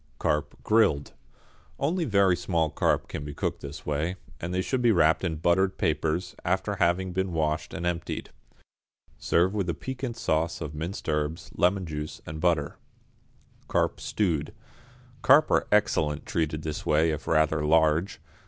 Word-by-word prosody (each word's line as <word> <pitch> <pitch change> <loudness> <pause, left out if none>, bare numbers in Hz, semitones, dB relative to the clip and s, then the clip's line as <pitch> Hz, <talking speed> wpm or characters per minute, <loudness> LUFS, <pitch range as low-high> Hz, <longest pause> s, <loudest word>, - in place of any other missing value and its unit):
=Carp, 75 +3 -1
Grilled.= 105 -10 +3 0.7
Only 165 +5 0
very 100 -6 +4
small 85 -3 0
carp - - +1
can 75 - -5
be 75 -1 -7
cooked - - -2
this 70 +1 -8
way, 75 +5 -1 0.2
and 85 - -4
they 90 +1 0
should 130 +4 -1
be 120 -1 +5
wrapped 80 -4 +3
in 85 -3 -1
buttered 85 +4 +2
papers, 80 +4 0
after 95 +3 -1
having 90 +1 +1
been 95 0 -1
washed 80 0 -1
and 85 - -5
emptied. 85 -1 -3 0.9
Serve 90 +4 +2
with 100 -4 -1
a 85 - -1
piquant 130 -2 -5
sauce 80 -6 0
of 75 -3 -5
minced 80 +6 -5
herbs, 75 +2 -2
lemon 95 +1 +2
juice 75 -1 -5
and 80 0 -7
butter. 80 -4 +1 0.9
=Carp, - - 0
Stewed.= 80 -8 -1 0.7
Carp 145 +5 +5
are - - +3
excellent 80 -8 +2
treated 80 -1 -2
this 75 -2 -4
way 80 +2 +3
if 75 -1 -5
rather 80 -1 +2
large. 80 +3 +2
85 Hz, 155 wpm, -27 LUFS, 75-95 Hz, 0.9 s, be